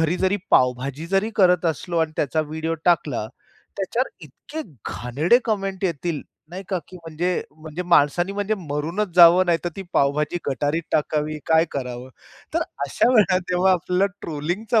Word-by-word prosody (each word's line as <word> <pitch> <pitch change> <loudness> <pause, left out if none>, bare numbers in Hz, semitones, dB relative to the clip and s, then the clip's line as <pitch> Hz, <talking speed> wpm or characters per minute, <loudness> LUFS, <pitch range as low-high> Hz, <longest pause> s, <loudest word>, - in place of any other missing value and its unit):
घरी 165 +2 +1
जरी 190 +2 +2
पावभाजी 130 +4 +2
जरी 195 +5 +1
करत 180 -3 +4
असलो 165 +2 -1
आणि 160 -1 0
त्याचा 155 +2 0
व्हिडिओ 160 +2 -3
टाकला. 150 -10 +1 0.5
त्याच्यावर 215 +6 -1 0.2
इतके 300 - -8 0.3
घाणेरडे 145 - +2
कमेंट 195 -3 -2
येतील 170 -3 -2 0.3
नाही 185 +3 -6
का, 185 - 0
की 185 - -11
म्हणजे, 170 +1 -2
म्हणजे 155 +3 -7
माणसानी 175 +2 +3
म्हणजे 205 +1 -1
मरूनच 165 +5 -2
जावं, 175 +1 +8
नाहीतर 170 0 +1
ती 195 - -5
पावभाजी 150 +4 +1
गटारीत 145 +4 -1
टाकावी 150 0 0
काय 160 0 +4
करावं? 125 -2 -5 0.5
तर - - +2 0.2
अशा 140 - +2
वेळेला 205 -6 +4
जेव्हा 180 +1 +3
आपल्याला 180 +2 +1
ट्रोलिंगचा 175 +9 -1
170 Hz, 150 wpm, -23 LUFS, 150-185 Hz, 0.5 s, जावं